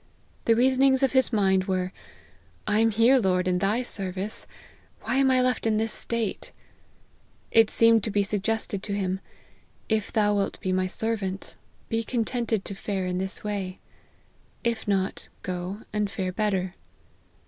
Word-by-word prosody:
The 230 - +5
reasonings 265 +2 +4
of 270 - +3
his 260 -1 +3
mind 190 -4 +2
were, 185 -1 -1 0.7
I 210 0 +2
am 225 0 +4
here, 230 +5 +5
Lord, 185 -4 +1
in 180 0 +1
thy 210 +6 +1
service; 195 -2 -3 0.5
why - - -1
am 270 -1 +4
I 255 -1 +4
left 250 -2 0
in 215 -1 +2
this 220 0 -1
state? 230 -4 -3 1.0
It 225 -1 +5
seemed 230 -2 +4
to - - -1
be 205 0 +2
suggested 205 0 -2
to 205 - -4
him, 190 -1 -1 0.7
If 220 -2 0
thou 210 -1 +2
wilt 200 -1 -1
be 185 - -2
my 185 0 +1
servant, 195 -1 -3 0.3
be 225 0 -1
contented 230 -2 -1
to - - -4
fare 195 -1 -3
in 180 0 -1
this 190 +1 +2
way; 195 -3 -3 0.9
if 235 -2 -1
not, 195 -2 -1
go, 185 +3 -4
and 210 -1 0
fare 190 -2 -3
better. 190 -2 -1
210 Hz, 160 wpm, -26 LUFS, 190-225 Hz, 1.0 s, The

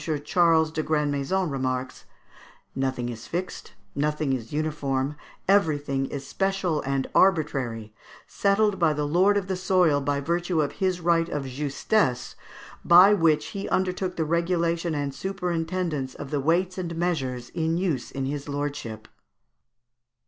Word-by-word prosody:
Charles 165 -2 +3
de 155 - -2
Grandmaison 150 +4 0
remarks, 130 -2 -3 0.7
"Nothing 130 -2 -2
is 115 -1 -8
fixed, 180 +2 -5 0.2
nothing 150 -1 0
is 115 -3 -4
uniform, 145 -2 -1 0.3
everything 145 -8 +2
is 140 -1 -6
special 195 -1 -1
and 135 -1 0
arbitrary, 135 - +1 0.3
settled 200 0 +1
by 165 -3 +3
the 150 0 -2
lord 185 +7 +3
of 200 - -1
the 190 0 -2
soil 180 -5 +2
by 140 0 0
virtue 170 +3 -1
of 145 -2 +1
his 185 -2 +1
right 170 0 +2
of 145 - -3
justesse, 140 - 0 0.5
by 180 +4 +8
which 165 -6 +2
he 200 -1 -5
undertook 185 0 -1
the 160 - -1
regulation 170 0 0
and 140 -1 -2
superintendence 170 -4 -3
of 145 -2 -8
the 145 - 0
weights 175 +6 +1
and 170 -2 -4
measures 135 -8 -2
in 165 0 -1
use 170 -9 -1
in 135 -1 -4
his 140 +1 -4
lordship." 140 -7 -4
155 Hz, 140 wpm, -25 LUFS, 140-180 Hz, 0.7 s, by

